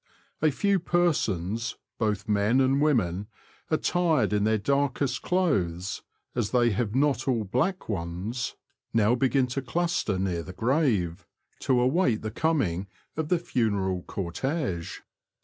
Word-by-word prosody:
A 155 - +5
few 200 +7 +1
persons, 115 - 0 0.2
both 105 -3 -1
men 105 +4 +3
and 135 +1 +3
women, 105 - +1 0.4
attired 160 -5 +2
in 105 0 +2
their 110 0 +3
darkest 140 +2 0
clothes 95 - 0 0.3
(as 120 -4 -1
they 120 -2 +3
have 105 +2 -1
not 135 -1 +2
all 120 -4 +1
black 130 - -1
ones), 100 +6 -3 0.4
now 110 +1 +4
begin 130 +1 +2
to 135 - -1
cluster 170 - 0
near 95 -3 -1
the 95 - -9
grave, 110 - 0 0.3
to 130 - +1
aw^ait 125 - +2
the 110 - -3
coming 105 - 0 0.3
of 155 -1 -2
the 180 - +4
funeral 100 - 0
cortege. 95 - -3
120 Hz, 130 wpm, -27 LUFS, 100-145 Hz, 0.4 s, A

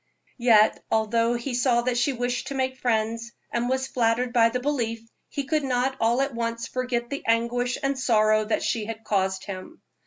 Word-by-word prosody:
Yet, 225 -3 +4
although 230 +2 +2
he 240 +2 -4
saw 240 -1 +2
that 250 0 0
she 245 +4 +2
wished 245 -1 -2
to 275 - -4
make 260 0 -1
friends, 230 0 -1 0.2
and 240 +1 -1
was 260 0 0
flattered 240 -1 0
by 230 -2 +5
the 250 +2 -2
belief, 230 -5 -2 0.2
he 280 - -3
could 300 +2 0
not 260 0 0
all 235 +3 +2
at 275 -1 -3
once 230 0 -3
forget 250 -1 -2
the 280 - -4
anguish 235 +2 +1
and 275 -1 0
sorrow 215 -3 +3
she 215 0 -1
had 225 0 -7
caused 190 -2 0
him. 200 - -8
240 Hz, 185 wpm, -25 LUFS, 225-255 Hz, 0.2 s, by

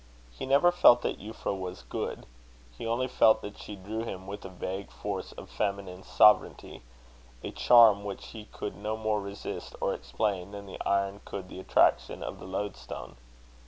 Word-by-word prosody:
He - - -7
never 140 +6 +5
felt 120 -8 +6
that - - -2
Euphra 105 -1 -4
was 90 -6 -6
good. - - -4 0.5
He 85 - -6
only 120 +3 0
felt 110 -3 +4
that 105 - -8
she 105 - -8
drew 105 +4 -5
him 95 -5 -6
with 100 +1 -7
a 95 - -7
vague 95 +2 -5
force - - -5
of - - -10
feminine 100 -2 -3
sovereignty 105 -8 +3 0.6
a - - -4
charm 115 -4 +6
which 100 -1 -6
he 110 -2 -9
could 105 - -6
no 105 +1 -3
more 110 -1 0
resist 100 0 -7
or - - 0
explain, 90 - -2
than 100 0 -7
the 95 - -8
iron 100 0 0
could 95 -2 -7
the - - -8
attraction 95 - +2
of - - -6
the - - -9
lodestone. 95 -13 -5
100 Hz, 175 wpm, -29 LUFS, 95-110 Hz, 0.6 s, felt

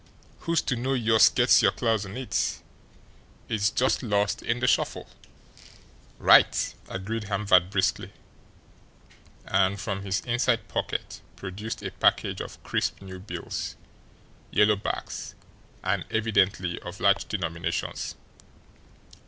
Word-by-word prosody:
Who's 170 - +2
ter 130 - -1
know 130 +3 -1
youse 110 -3 +5
gets - - +4
yer - - +5
claws 110 -4 0
on 95 - -8
it? 130 -1 -1 0.9
It's 105 -1 +1
just 130 +4 +1
lost 105 -4 0
in 115 +1 -1
de 125 - 0
shuffle." 125 - +1 1.1
"Right!" - - +5 0.2
agreed 105 +3 -4
Hamvert 100 -3 +3
briskly 95 -1 0 1.3
and 95 +1 +1
from 100 0 -3
his 95 0 -1
inside 120 -1 0
pocket - - -4
produced 100 +3 -6
a - - -4
package - - +1
of - - -9
crisp - - -1
new 95 -1 -9
bills, 95 - -5 0.7
yellow 105 0 +4
backs, 100 - -5 0.5
and - - 0
evidently 95 -5 +1
of 90 +2 -9
large 100 0 +3
denominations. 85 -4 -3
105 Hz, 120 wpm, -26 LUFS, 95-115 Hz, 1.3 s, youse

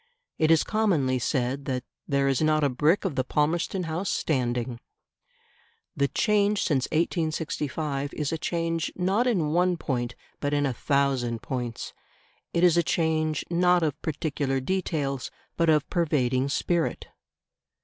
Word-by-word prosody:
It 155 - +3
is 165 -1 +5
commonly 165 - +1
said 130 +2 -1
that 130 -2 -2 0.2
"there 140 -1 +2
is 135 0 +1
not 155 -1 +3
a 145 - +3
brick 150 +10 +2
of 185 - 0
the 130 - 0
Palmerston 160 +7 0
House 165 +4 -2
standing". 120 -4 -1 1.2
The 140 0 +2
change 205 +3 +2
since 135 -5 +1
1865 155 -3 -1
is 150 -2 -2
a 165 - -1
change 165 -1 -1
not 195 +7 +1
in 180 -11 +1
one 180 +1 +2
point 125 -5 -2 0.2
but 145 0 0
in 145 0 +2
a 135 - 0
thousand 130 -3 0
points; 120 -3 -4 0.6
it 170 - +1
is 175 -2 +5
a - - +6
change 155 -2 0
not 180 0 +3
of 150 -2 -1
particular 145 -3 -1
details 140 -4 -2 0.3
but 165 -1 +2
of 150 -2 +3
pervading 135 -6 +1
spirit. 170 +3 0
155 Hz, 145 wpm, -26 LUFS, 135-170 Hz, 1.2 s, a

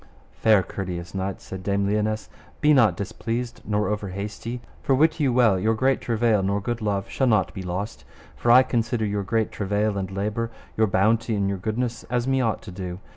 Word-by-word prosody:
Fair 110 -4 +4
courteous 90 -3 -5
knight, 95 +3 -3
said 95 -5 -7
Dame 100 +1 0
Lionesse, 105 0 0 0.3
be 150 0 +5
not 110 -10 +4
displeased 115 +4 -4
nor 105 0 0
over 105 -1 -2
hasty; 105 +5 -5 0.2
for 135 - +2
wit 155 +4 +3
you 140 -4 +2
well 120 -6 +4
your 110 +4 +2
great 130 +3 +2
travail 115 -3 +2
nor 100 +1 0
good 120 +3 -3
love 100 -2 -1
shall 135 - 0
not 105 -6 +2
be 95 - -6
lost, 95 +4 -4 0.3
for 120 - -1
I 125 +2 +8
consider 120 -2 0
your 100 0 -1
great 110 +2 0
travail 100 0 0
and 95 -1 -3
labour, 105 +4 -2 0.3
your 110 0 +3
bounty 110 +4 +2
and 100 -1 0
your 100 -1 -2
goodness 115 +4 -2
as 120 +1 -1
me 135 0 +2
ought 115 -3 -1
to 100 - -9
do. 90 -1 -5
105 Hz, 200 wpm, -24 LUFS, 100-120 Hz, 0.3 s, I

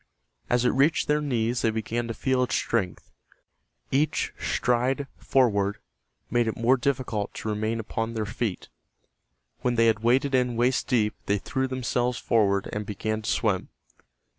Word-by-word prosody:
As 120 0 +2
it - - +5
reached 140 +5 +2
their 150 0 +2
knees 120 -4 0
they 115 - +2
began 115 +2 -2
to 115 - -4
feel 130 -1 +1
its 125 - 0
strength, 95 -7 -2 0.8
Each 145 +4 +1
stride 125 +3 +1
forward 105 -6 +2 0.5
made 120 -1 +2
it 110 - -2
more 120 +3 +4
difficult 120 -5 -2
to 110 - -4
remain 110 +2 -1
upon 115 +1 -3
their 110 -1 -1
feet. 105 -2 -3 0.9
When 125 -1 0
they 115 0 +4
had 110 -1 +3
waded 130 +5 +2
in 125 -2 +2
waist 125 +3 +1
deep 110 -5 +2
they 100 - +2
threw 130 +6 -2
themselves 125 -1 -1
forward 100 -4 +2
and 105 - -2
began 110 +2 -3
to 110 - -4
swim. 100 -5 0
120 Hz, 160 wpm, -26 LUFS, 110-130 Hz, 0.9 s, it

